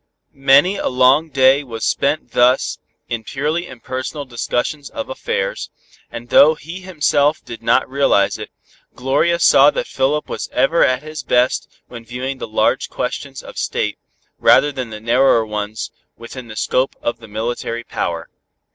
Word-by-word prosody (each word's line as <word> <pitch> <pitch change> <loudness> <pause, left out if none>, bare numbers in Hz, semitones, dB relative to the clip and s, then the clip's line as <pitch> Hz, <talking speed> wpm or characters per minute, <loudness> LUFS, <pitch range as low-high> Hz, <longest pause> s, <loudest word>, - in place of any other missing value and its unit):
Many 140 +8 +4
a - - -2
long 130 +5 +3
day 135 0 +4
was 115 -4 -5
spent 140 -3 0
thus 125 +2 +2 0.3
in 115 -2 -4
purely 150 +8 -2
impersonal 130 +4 -6
discussions 130 +4 -3
of 280 -1 -6
affairs, - - -3 0.4
and 120 +1 -9
though 155 +5 +6
he 165 +5 -9
himself 150 -5 +1
did 115 - -9
not 130 - +2
realize 130 -7 +2
it, - - -7 0.5
Gloria 140 +7 +1
saw - - +6
that - - -2
Philip 150 - -1
was - - -5
ever 165 +5 +3
at 130 +1 +1
his 155 -1 -6
best 125 -1 +1 0.2
when 120 -2 -10
viewing 130 +3 -5
the - - -5
large 110 - +1
questions - - -5
of - - -8
State, - - -2 0.4
rather 145 - +5
than 130 -4 -5
the 110 -1 -7
narrower 115 +1 +3
ones 105 0 -4 0.3
within 120 +1 -9
the 110 - -9
scope 130 +5 0
of 120 - -2
the 115 - -13
military 115 +2 -4
power. 85 -7 -4
130 Hz, 155 wpm, -19 LUFS, 120-150 Hz, 0.5 s, though